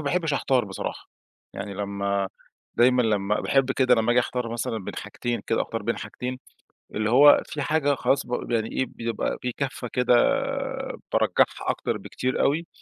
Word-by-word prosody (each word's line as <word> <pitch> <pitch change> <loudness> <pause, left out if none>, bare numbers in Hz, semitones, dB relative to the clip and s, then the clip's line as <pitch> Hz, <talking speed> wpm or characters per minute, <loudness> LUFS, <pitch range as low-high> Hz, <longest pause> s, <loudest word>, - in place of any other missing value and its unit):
باحبش 160 +1 0
أحتار 130 -4 +2
بصراحة. 95 -1 -6 0.5
يعني 100 0 -5
لمّا 100 0 -1 0.5
دايمًا 125 +1 +4
لمّا 105 -2 +1
باحب 135 -1 +2
كده 130 -2 +4
لمّا 115 0 +1
آجي 125 - +5
أختار 120 -1 -3
مثلًا 115 -1 -2
بين - - -6
حاجتين، 120 -1 -3
كده 115 - +1
أختار 115 - -4
بين 115 +3 -1
حاجتين، 125 +1 -5 0.6
اللي 105 0 0
هو 145 +4 +8
فيه 150 - -5
حاجة 145 -1 +1
خلاص 135 +1 +1
ب - - -11 0.2
بي 120 - 0
يعني 110 -1 -1
إيه، 130 - 0
بيبقى 115 -2 -3
فيه 125 - -2
كَفّة 130 -3 -3
كده، 125 -1 +3 1.0
بارجّحها - - +2
أكتر - - -3
بكتير 130 0 -2
أوي 160 +5 +1
125 Hz, 170 wpm, -25 LUFS, 110-135 Hz, 1.0 s, هو